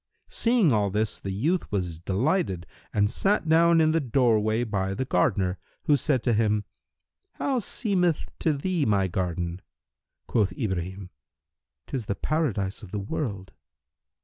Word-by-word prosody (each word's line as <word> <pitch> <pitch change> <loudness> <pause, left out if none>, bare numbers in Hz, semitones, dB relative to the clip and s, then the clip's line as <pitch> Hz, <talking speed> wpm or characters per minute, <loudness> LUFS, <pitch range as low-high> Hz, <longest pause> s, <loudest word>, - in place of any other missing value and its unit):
Seeing 230 - +3
all 105 -3 +2
this 105 +2 -1
the 95 - -5
youth 150 - 0
was 90 -5 -2
delighted 95 - 0 0.3
and 105 0 +2
sat 195 - +1
down 165 +1 +5
in 155 -1 +4
the 165 - +2
doorway 115 -4 +2
by 95 -4 -1
the 130 - -2
gardener, 95 -4 +1 0.2
who 150 - +4
said 135 -3 +1
to 120 - +2
him, 105 -1 +1 0.7
"How 270 -3 0
seemeth 185 - 0
to 160 - +2
thee 170 +3 -1
my 100 -6 +2
garden?" 90 -1 -2 0.6
Quoth 100 -5 +1
Ibrahim 95 -1 -4 0.7
"'Tis 125 -6 -4
the 100 - -1
Paradise 110 -12 -1
of - - -10
the 105 - -3
world!" 100 -2 -4
110 Hz, 145 wpm, -26 LUFS, 95-155 Hz, 0.7 s, down